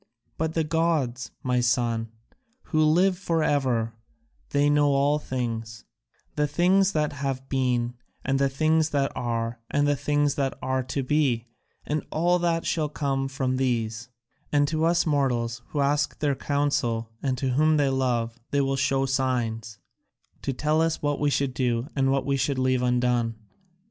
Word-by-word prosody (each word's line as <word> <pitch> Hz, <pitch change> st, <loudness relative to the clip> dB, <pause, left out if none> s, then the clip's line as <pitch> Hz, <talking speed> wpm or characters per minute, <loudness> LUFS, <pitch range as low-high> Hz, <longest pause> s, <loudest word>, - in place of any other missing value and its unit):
But 160 Hz, 0 st, -2 dB
the 165 Hz, -, +2 dB
gods, 150 Hz, -7 st, 0 dB
my 125 Hz, -1 st, +1 dB
son, 120 Hz, -2 st, +1 dB, 0.6 s
who 155 Hz, -1 st, +1 dB
live 180 Hz, +4 st, +3 dB
for 165 Hz, -4 st, 0 dB
ever, 125 Hz, -7 st, +1 dB, 0.6 s
they 145 Hz, 0 st, +2 dB
know 145 Hz, 0 st, +4 dB
all 140 Hz, +1 st, +2 dB
things, 115 Hz, -5 st, -4 dB, 0.5 s
the 150 Hz, 0 st, +1 dB
things 185 Hz, +6 st, +3 dB
that 150 Hz, -2 st, 0 dB
have 135 Hz, -2 st, -3 dB
been 125 Hz, -3 st, 0 dB, 0.3 s
and 135 Hz, 0 st, +1 dB
the 140 Hz, 0 st, +3 dB
things 155 Hz, +3 st, +2 dB
that 140 Hz, -2 st, 0 dB
are 115 Hz, 0 st, -2 dB
and 145 Hz, 0 st, +1 dB
the 145 Hz, -, +3 dB
things 145 Hz, +1 st, +1 dB
that 135 Hz, -2 st, -2 dB
are 130 Hz, 0 st, -1 dB
to 135 Hz, +1 st, -2 dB
be, 130 Hz, -4 st, +1 dB, 0.4 s
and 150 Hz, 0 st, -1 dB
all 175 Hz, +3 st, +2 dB
that 170 Hz, -1 st, 0 dB
shall 155 Hz, -3 st, 0 dB
come 135 Hz, -2 st, -1 dB
from 130 Hz, -1 st, -1 dB
these; 120 Hz, -2 st, -1 dB, 0.4 s
and 145 Hz, -1 st, +3 dB
to 160 Hz, 0 st, 0 dB
us 170 Hz, 0 st, +3 dB
mortals 125 Hz, -6 st, 0 dB
who 145 Hz, -, -2 dB
ask 145 Hz, +1 st, +1 dB
their 145 Hz, -2 st, +1 dB
counsel 135 Hz, -6 st, -1 dB
and 130 Hz, -2 st, -1 dB
whom 150 Hz, +4 st, +2 dB
they 145 Hz, -2 st, +2 dB
love 125 Hz, -3 st, -1 dB
they 140 Hz, -, +1 dB
will 135 Hz, 0 st, 0 dB
show 135 Hz, 0 st, +1 dB
signs, 120 Hz, -5 st, -1 dB, 0.6 s
to 140 Hz, -, -2 dB
tell 150 Hz, +4 st, +1 dB
us 165 Hz, -1 st, 0 dB
what 145 Hz, -1 st, 0 dB
we 145 Hz, -, +2 dB
should 140 Hz, -2 st, 0 dB
do 125 Hz, -1 st, 0 dB
and 135 Hz, -1 st, +2 dB
what 135 Hz, 0 st, 0 dB
we 140 Hz, -1 st, +1 dB
should 135 Hz, +1 st, 0 dB
leave 130 Hz, -1 st, +1 dB
undone. 125 Hz, -2 st, +1 dB
135 Hz, 165 wpm, -26 LUFS, 125-150 Hz, 0.6 s, know